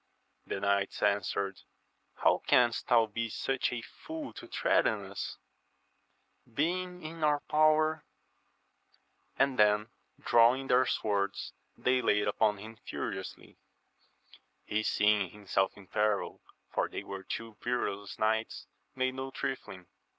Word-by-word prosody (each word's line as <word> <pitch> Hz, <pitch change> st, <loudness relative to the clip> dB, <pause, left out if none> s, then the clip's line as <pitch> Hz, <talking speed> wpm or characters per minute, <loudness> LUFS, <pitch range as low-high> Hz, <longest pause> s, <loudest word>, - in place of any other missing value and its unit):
The -, -, -3 dB
knights 100 Hz, 0 st, 0 dB
answered, 100 Hz, -1 st, 0 dB, 0.6 s
How -, -, +5 dB
canst 120 Hz, -2 st, +3 dB
thou 115 Hz, -2 st, +5 dB
be 115 Hz, +2 st, -3 dB
such 130 Hz, +4 st, -1 dB
a 120 Hz, -2 st, -4 dB
fool 315 Hz, -, -8 dB
io -, -, -11 dB
threaten -, -, +2 dB
us, -, -, -5 dB, 1.1 s
being 180 Hz, +3 st, -1 dB
in 160 Hz, +1 st, -6 dB
our 150 Hz, -1 st, +3 dB
power? 155 Hz, 0 st, +3 dB, 1.3 s
and 135 Hz, -2 st, +2 dB
then 105 Hz, +1 st, +4 dB, 0.3 s
drawing 120 Hz, +3 st, +4 dB
their 125 Hz, +1 st, +4 dB
swords 100 Hz, -2 st, -1 dB, 0.2 s
they 125 Hz, 0 st, +2 dB
laid 105 Hz, -3 st, +2 dB
upon 105 Hz, 0 st, +2 dB
him 110 Hz, +3 st, -10 dB
furiously. -, -, -6 dB, 1.1 s
He 105 Hz, -, 0 dB
seeing 105 Hz, -3 st, +2 dB
himself 100 Hz, -1 st, -1 dB
in 100 Hz, -, -13 dB
peril, 105 Hz, +1 st, 0 dB, 0.3 s
for -, -, 0 dB
they -, -, -5 dB
were 95 Hz, -1 st, -6 dB
two 115 Hz, +3 st, -6 dB
perilous 100 Hz, -5 st, -2 dB
knights, 110 Hz, +1 st, 0 dB, 0.3 s
made 130 Hz, 0 st, 0 dB
no 130 Hz, +1 st, -5 dB
trifling. 105 Hz, -9 st, -5 dB
115 Hz, 120 wpm, -31 LUFS, 105-135 Hz, 1.3 s, How